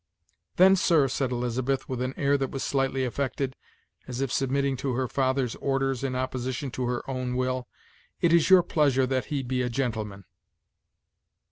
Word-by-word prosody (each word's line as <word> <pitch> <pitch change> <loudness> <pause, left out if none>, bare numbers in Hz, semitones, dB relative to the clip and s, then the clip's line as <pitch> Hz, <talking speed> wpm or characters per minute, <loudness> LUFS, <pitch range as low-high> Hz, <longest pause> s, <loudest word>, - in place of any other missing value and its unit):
"Then, 190 +2 +7
sir," 165 -6 +3
said 130 0 -1
Elizabeth, 125 +2 -1
with 130 -2 -3
an 130 +1 -2
air 140 0 +2
that 135 -2 -1
was 135 - -4
slightly 135 -1 0
affected, 130 +1 -2 0.5
as 125 -1 -5
if 135 -3 -1
submitting 135 0 +1
to 130 0 -2
her 130 0 0
father's 130 -2 0
orders 135 -1 -1
in 130 -2 -1
opposition 130 +1 -3
to 125 0 -2
her 120 0 -3
own 130 -2 -3
will, 130 0 -1 0.5
"it 170 -1 +3
is 170 0 +4
your 185 -2 +8
pleasure 140 -6 +2
that 130 0 -1
he 140 -3 -2
be 125 0 -1
a 125 - -1
gentleman." 110 -6 -3
130 Hz, 170 wpm, -27 LUFS, 125-135 Hz, 0.5 s, your